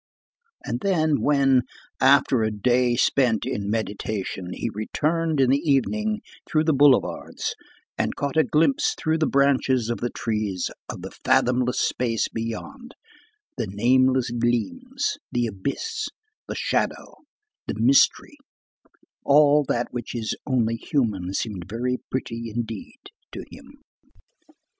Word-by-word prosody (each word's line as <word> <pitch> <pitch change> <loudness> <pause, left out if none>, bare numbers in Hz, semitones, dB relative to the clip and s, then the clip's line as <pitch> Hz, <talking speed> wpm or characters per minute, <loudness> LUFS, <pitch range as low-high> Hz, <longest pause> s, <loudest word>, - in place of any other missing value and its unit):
And 120 - -2
then, 160 -5 +1
when, 135 -3 +4 0.4
after 135 -2 +4
a 110 - +1
day 120 +3 +2
spent 120 -3 +2
in 100 0 -3
meditation, 105 -4 -3
he 115 - -3
returned 155 +8 -1
in 130 -1 +4
the 140 - +3
evening 215 - 0 0.3
through 155 -1 +2
the 160 0 +2
boulevards, 140 -2 +2 0.5
and - - 0
caught 140 0 -3
a 160 - +5
glimpse 270 - +2
through 160 +1 0
the 155 - +2
branches 130 -4 +2
of 120 - -3
the 120 - -1
trees 105 -6 -2 0.2
of - - -7
the - - -7
fathomless 125 0 +1
space 115 -3 0
beyond, 240 - -6 0.6
the 115 - -1
nameless 130 +5 +2
gleams, 120 - -1
the 120 0 +1
abyss, 140 - -3 0.4
the - - -5
shadow, - - -2 0.5
the - - -2
mystery, 290 - +3 0.9
all 145 +1 +5
that 120 0 -1
which 120 0 -5
is 110 -2 -2
only 115 -4 +1
human 110 - -1
seemed 95 -3 -4
very 125 +4 -1
pretty 115 -3 -4
indeed 115 - -5 0.3
to - - -7
him. - - -15
125 Hz, 130 wpm, -24 LUFS, 115-150 Hz, 0.9 s, a